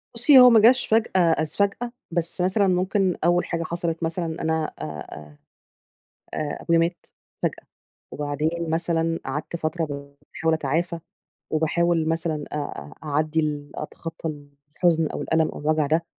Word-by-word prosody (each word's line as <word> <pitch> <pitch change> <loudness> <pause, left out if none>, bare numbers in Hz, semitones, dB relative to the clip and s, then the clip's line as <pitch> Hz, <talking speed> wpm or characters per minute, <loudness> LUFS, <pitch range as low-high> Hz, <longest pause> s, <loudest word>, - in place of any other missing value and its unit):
بُصّي، 260 +3 +7
هو 250 0 +10
ما 225 -2 +7
جاش 245 +4 +5
فجأة 220 -4 +2
إذ 160 -2 +2
فجأة، 200 +4 0 0.2
بس 170 +1 -2
مثلًا 190 +2 +2
ممكن 185 +1 +1
أول 175 +1 +3
حاجة 170 -1 -2
حصلت 170 0 -3
مثلًا 165 0 -2
أنا 160 -1 0
أ - - -8
أ 75 -1 -8 1.0
آآ، 150 -1 -3
أبويا 170 0 +3
مات 170 +1 -1 0.4
فجأة، - - -2 0.5
وبعدين 155 +3 -2
مثلًا 165 0 0
قعدت 150 +5 -4
فترة 160 +1 -2
باحاول 140 +2 -3
أتعافى، 165 +3 -1 0.5
وباحاول 160 +1 +1
مثلًا 160 -2 -1
أ - - -2
أ 110 - -5
أعدّي 155 +2 +1
ال 145 -1 -3
أتخطّى 160 +1 -6 0.5
الحزن 165 -3 +3
أو - - -4
الألم 160 -1 +2
أو - - -7
الوجع 155 0 +1
ده، 160 +3 +1
165 Hz, 150 wpm, -24 LUFS, 155-175 Hz, 1.0 s, هو